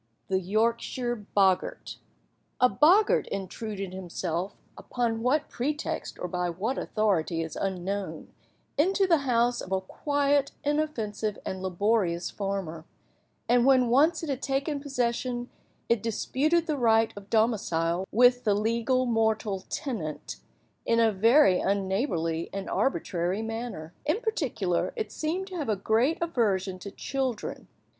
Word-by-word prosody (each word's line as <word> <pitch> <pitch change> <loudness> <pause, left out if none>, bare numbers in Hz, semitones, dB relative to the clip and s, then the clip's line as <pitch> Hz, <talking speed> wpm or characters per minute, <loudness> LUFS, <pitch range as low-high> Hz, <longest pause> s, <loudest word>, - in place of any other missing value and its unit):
THE 190 -1 +2
YORKSHIRE 230 +3 -1
BOGGART. 190 -2 +2 0.6
A 250 - +6
boggart 330 - +4
intruded 195 0 -5
himself, 180 0 -3 0.2
upon 230 -2 -2
what 270 +5 +1
pretext 295 +5 -3
or 180 - -4
by 180 0 -1
what 200 +10 -2
authority 180 -6 0
is 160 -2 -7
unknown, 195 +1 -3 0.5
into 385 +5 +3
the 335 -4 +4
house 240 0 +2
of 185 - -9
a 190 - +2
quiet, 285 +7 0
inoffensive, 235 -9 -1
and 190 0 -4
laborious 190 -2 0
farmer; 195 -5 -4 0.6
and, 245 0 +4
when 255 -2 +5
once 310 +7 +4
it 320 - -4
had 270 -1 -2
taken 280 +2 -1
possession, 245 -2 -2 0.4
it 235 -3 +2
disputed 295 +9 +1
the 305 -3 -1
right 225 -2 +3
of 200 0 -11
domicile 190 -6 +1
with 245 +2 +5
the 210 -3 +3
legal 230 +4 +1
mortal 220 -4 0
tenant, 180 - -4 0.5
in 230 - +2
a 225 -1 +4
very 225 0 +5
unneighbourly 190 - -1
and 195 0 -5
arbitrary 185 -5 0
manner. 225 -8 -5
In 315 +8 +2
particular, 285 - -1
it 445 -3 -3
seemed 340 +5 -2
to 370 - -6
have 295 -7 -3
a 215 - +2
great 225 +10 +2
aversion 200 - 0
to 200 - -7
children. 260 +2 -3
225 Hz, 135 wpm, -28 LUFS, 190-265 Hz, 0.6 s, A